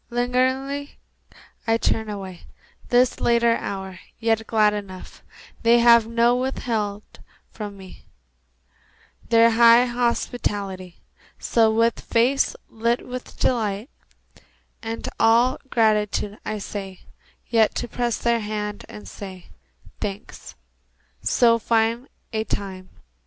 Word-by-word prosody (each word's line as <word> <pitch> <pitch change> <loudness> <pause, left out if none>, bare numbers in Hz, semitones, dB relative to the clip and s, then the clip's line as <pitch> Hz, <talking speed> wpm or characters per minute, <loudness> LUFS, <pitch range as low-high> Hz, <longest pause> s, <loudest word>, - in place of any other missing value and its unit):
Lingeringly 260 +4 -1 0.7
I 225 0 +3
turn 220 -1 -1
away, 190 -4 -8 0.4
This 245 0 +3
late 235 0 +2
hour, 195 -5 -1 0.2
yet 225 -1 0
glad 215 -2 +3
enough 195 -3 -8 0.4
They 230 +1 +5
have 235 -1 +6
not 235 +2 +2
withheld 220 -5 -2 0.5
from 205 -2 -7
me 190 -1 -13 1.2
Their 230 0 +5
high 235 +1 +6
hospitality. 205 -6 -2 0.4
So, 225 -2 +2
with 230 +1 +2
face 250 +4 +1
lit 235 +2 -1
with 250 0 -8
delight 220 -1 -1 0.9
And 225 0 -5
all 235 +3 +4
gratitude, 210 -2 +1
I 215 - -3
stay 195 -2 -7 0.5
Yet 225 -2 +2
to 240 - -3
press 240 -1 -2
their 235 0 +1
hands 210 -1 -4
and 210 - -10
say, 190 -3 -10 0.5
"Thanks. 205 +2 -7 0.7
So 230 -1 +3
fine 230 +3 +1 0.3
a 220 0 0
time 190 -3 -5
225 Hz, 110 wpm, -23 LUFS, 205-240 Hz, 1.2 s, have